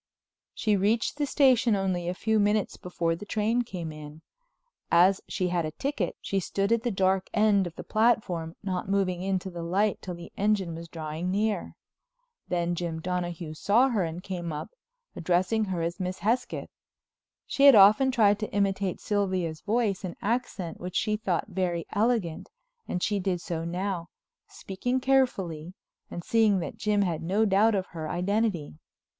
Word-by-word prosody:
She 215 -2 +1
reached 210 +7 +1
the 290 -1 0
station 255 -6 +4
only 185 -3 -1
a 180 - -3
few 220 +2 +1
minutes 210 0 +1
before 170 -2 -2
the 180 - -9
train 220 +3 0
came 180 -8 -5
in. 155 +1 -11 0.7
As 185 +3 +5
she 185 -2 -1
had 175 -1 0
a 155 - -2
ticket, 215 - -3
she 195 - -1
stood 195 +3 -1
at 230 -1 +3
the 240 - -1
dark 190 -2 +1
end 210 -3 +3
of 170 - -10
the - - -7
platform, 210 -8 +1
not 190 -1 -3
moving 190 -3 0
into 190 0 -2
the 170 -1 -6
light 195 +5 0
till 180 -2 -6
the 170 0 -11
engine 200 -4 +1
was 165 +1 -8
drawing 160 +1 -5
near. 210 +3 -1 0.7
Then 175 -1 0
Jim 170 -2 -3
Donahue 175 -2 -3
saw 225 - +3
her 220 -6 0
and 170 +2 -5
came 175 -4 -4
up, 150 - -6 0.4
addressing 185 +6 +1
her 180 -4 -2
as 170 +3 -3
Miss 185 0 -3
Hesketh. 225 +7 -1 0.7
She 280 - +2
had 275 - +9
often 215 +7 +7
tried 210 -5 +3
to 215 - -4
imitate 195 -2 0
Sylvia's 185 -6 -1
voice 210 -3 0
and 180 -2 -5
accent 210 -6 -2
which 180 0 -6
she 215 -1 +1
thought 190 -5 -1
very 180 -3 -2
elegant, 210 -6 0 0.4
and 180 - -2
she 205 -1 +1
did 185 -2 -1
so 165 -1 -4
now, 180 0 -3 0.4
speaking 245 +7 -3
carefully 190 - 0 0.3
and 175 - -6
seeing 220 -2 +3
that 165 -5 -4
Jim 210 -1 +1
had 170 -4 -2
no 195 +6 +1
doubt 210 +2 +4
of 190 -1 -1
her 160 -2 -6
identity. 180 - -1
190 Hz, 170 wpm, -27 LUFS, 175-215 Hz, 0.7 s, had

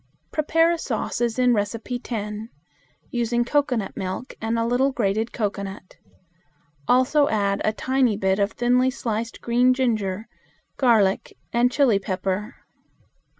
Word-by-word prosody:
Prepare 325 +2 +2
a 340 - -1
sauce - - -3
as 235 -1 0
in 250 -1 +4
No. 205 -3 +3
10, 220 -1 -5 0.6
using 240 0 0
cocoanut 250 -6 0
milk 190 +7 -5
and 225 +1 -1
a 230 - +1
little 250 +4 +2
grated 220 -1 0
cocoanut. 200 -3 -4 0.9
Also 260 +4 +4
add 200 -2 0
a 215 - +2
tiny 255 -2 +1
bit 190 0 +1
of 200 +1 +1
thinly 250 +1 +2
sliced 230 -3 -4
green 245 +2 +3
ginger, 220 -5 -1 0.5
garlic, 220 -7 +2 0.2
and 240 +1 +3
chili 245 -7 +3
pepper. 195 +4 -3
230 Hz, 130 wpm, -23 LUFS, 205-250 Hz, 0.9 s, in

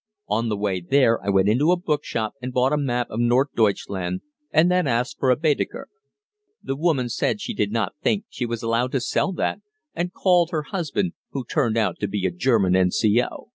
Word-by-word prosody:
On 115 +2 0
the 105 - -1
way 100 -2 -1
there 115 +4 +2
I 100 - -2
went 95 0 +3
into 135 +10 +3
a 180 - +3
bookshop 145 - -2
and 125 +1 -4
bought 125 +3 +2
a - - +2
map 125 -4 0
of 110 - -3
Nord 120 +4 +3
Deutschland 95 -4 0 0.3
and 160 +4 +4
then 180 -3 +2
asked 120 +1 -1
for 130 - +2
a 125 - +5
Baedeker. 150 +2 -1 0.7
The 135 - -2
woman 145 -5 +1
said 120 - -1
she 235 - -4
did 105 - -1
not 110 -2 -1
think 210 0 0
she 125 - -4
was 115 -1 -4
allowed 115 +2 0
to 135 - +2
sell 140 +8 0
that, - - -2 0.3
and 175 +1 -2
called 180 -3 +3
her 155 -3 -2
husband, 180 +1 -2 0.2
who 135 -3 -3
turned 120 -5 0
out 105 -6 0
to 105 - -1
be 100 -1 -2
a 95 - +1
German 95 -1 +2
N.C.O. 105 - +1
125 Hz, 210 wpm, -23 LUFS, 105-150 Hz, 0.7 s, a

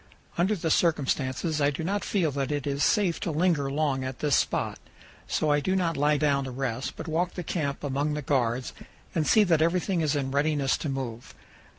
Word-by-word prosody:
Under 190 +5 +2
the 165 -4 -2
circumstances 150 -1 +1
I 140 - +4
do 145 +3 -4
not 200 +4 -1
feel 175 -7 0
that 140 +1 -2
it 145 -2 -2
is 140 0 -1
safe 200 -6 +2
to - - -3
linger 160 -3 +1
long 140 -2 0
at 130 -1 -5
this 145 -3 +2
spot; - - 0 0.5
so 155 - +1
I 145 - +3
do 185 +6 0
not 170 -3 0
lie 150 +1 +2
down 140 -2 +1
to - - -5
rest, 130 -1 -3
but - - -7
walk 170 +3 -1
the 180 - -4
camp 145 -4 -3
among 145 +2 -1
the 150 - -4
guards 125 -2 0 0.4
and 155 -3 0
see 215 - +6
that 165 -5 +2
everything 175 +2 +1
is 155 -2 +1
in 135 -2 -1
readiness 140 -1 +1
to 150 - -4
move. 125 -4 -5
150 Hz, 210 wpm, -27 LUFS, 135-165 Hz, 0.5 s, see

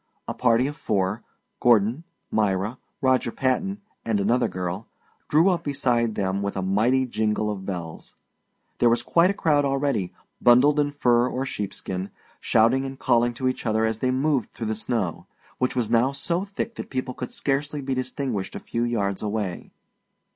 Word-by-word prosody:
A - - -2
party 120 0 +3
of 145 +2 -3
four 100 -3 -1 0.4
Gordon, 120 +6 +3 0.3
Myra, 105 +2 0 0.2
Roger 130 -2 +2
Patton, 195 - -1 0.2
and 110 -3 0
another 120 +5 +2
girl 90 +3 -4 0.4
drew 160 +6 +5
up 175 -2 0
beside 120 -6 0
them 95 0 -1
with 100 0 -3
a 95 - -1
mighty 115 +8 +2
jingle 110 -2 0
of 95 -2 -6
bells. 85 -4 -6 0.6
There 120 - +5
were 115 - +5
quite 170 +9 +3
a - - +1
crowd 150 -5 +2
already, 135 -9 0 0.3
bundled 135 +5 +6
in 145 -1 +2
fur 120 -4 +3
or 130 +1 -2
sheepskin, 95 -4 -4 0.3
shouting 115 +4 +3
and 135 0 -6
calling 120 -2 +2
to 130 +2 -1
each 130 - -2
other 110 0 +2
as 110 0 -1
they 130 - +1
moved 135 0 0
through 115 - -5
the - - -5
snow, 110 -5 -2 0.3
which 125 - 0
was 115 -3 -1
now 120 +4 +3
so 170 +6 -1
thick 205 +3 -4
that - - -6
people 130 -1 -3
could 125 - -5
scarcely 145 +2 -1
be 135 -1 -2
distinguished 130 -5 -3
a - - -4
few 115 - -3
yards 100 -5 -1
away. 105 -4 -3
120 Hz, 175 wpm, -25 LUFS, 105-135 Hz, 0.6 s, bundled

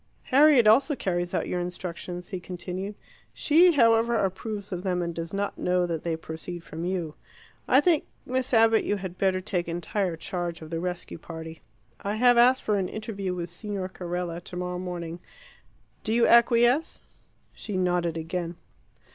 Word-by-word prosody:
"Harriet 280 -2 +6
also 270 +7 +5
carries 175 -5 -2
out - - -1
your 180 - -1
instructions," 175 0 -6
he 185 - -4
continued. 185 +3 -6 0.4
"She, 340 +4 +5
however, 230 -3 +4
approves 200 0 -2
of 180 -1 -3
them, 180 -2 -1
and 170 0 -3
does 165 0 -5
not 200 +1 -3
know 180 0 +1
that 165 -3 -3
they 170 -1 -1
proceed 160 +2 -7
from 165 +1 -6
you. 175 -4 -2 0.5
I 265 - +6
think, 325 -2 +2 0.2
Miss 255 +1 -2
Abbott, 225 -2 +5
you 205 - 0
had 190 -2 -7
better 190 -1 +2
take 180 -2 -2
entire 175 +2 -2
charge 175 0 -4
of 155 - -11
the 165 - -2
rescue 175 -1 -5
party. 160 0 -9 0.4
I 205 +1 -2
have 245 +2 +5
asked 250 +2 +5
for 210 -1 +1
an 185 - -2
interview 200 -4 -4
with 175 -1 -5
Signor 195 0 -4
Carella 175 -2 -4
tomorrow 180 0 -4
morning. 175 -2 -5 0.8
Do 220 +1 0
you 235 - +4
acquiesce?" 240 +5 +4 0.5
She 205 -3 -5
nodded 175 -2 0
again. 170 +1 -4
185 Hz, 165 wpm, -26 LUFS, 175-225 Hz, 0.8 s, Harriet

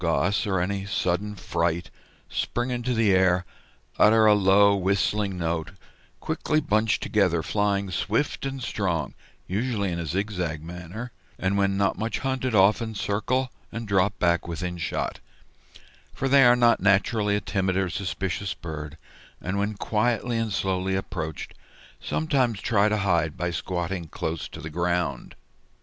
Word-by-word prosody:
Goss, 100 +6 +1
"or 95 -2 +1
any 95 +2 -2
sudden 100 +2 -1
fright, 85 -2 -1 0.4
spring 120 +1 -2
into 125 0 -1
the 110 -4 +3
air, 95 -1 +3 0.5
utter 110 +1 +6
a 105 - +7
low 100 0 +5
whistling 100 +1 0
note, 85 0 -2 0.5
quickly 155 - 0
bunch 110 -6 +1
together, 90 -6 +1
flying 100 +1 0
swift 110 +10 -1
and 135 -2 -4
strong, 85 - -1 0.3
usually 100 -1 -1
in 85 - -3
a 85 - -4
zigzag 90 -4 -2
manner, 90 +8 -7 0.3
and 95 +1 0
when 100 -1 +1
not 100 -1 +1
much 110 +1 -1
hunted 130 -3 -1
often 110 +3 +3
circle 125 +6 -1 0.2
and 115 -1 -5
drop 100 0 +2
back 85 -1 +1
within 85 +1 -4
shot; 80 - -2 1.0
for 135 - -1
they 135 0 +6
are 120 0 +7
not 120 -1 +4
naturally 100 +2 +2
a - - +1
timid 95 -2 -1
or 95 -1 +1
suspicious 95 +1 -3
bird, 75 -2 -7 0.4
and 100 +2 -2
when 105 +1 -1
quietly 115 +3 0
and 115 -1 -1
slowly 95 -1 0
approached, 80 -5 -4 0.5
sometimes 130 -9 0
try 105 -2 +2
to 105 - +1
hide 85 -6 +1
by 90 0 -1
squatting 85 0 -3
close 80 +1 -4
to - - -10
the 80 - -7
ground." 85 -5 -1
100 Hz, 150 wpm, -25 LUFS, 90-110 Hz, 1.0 s, a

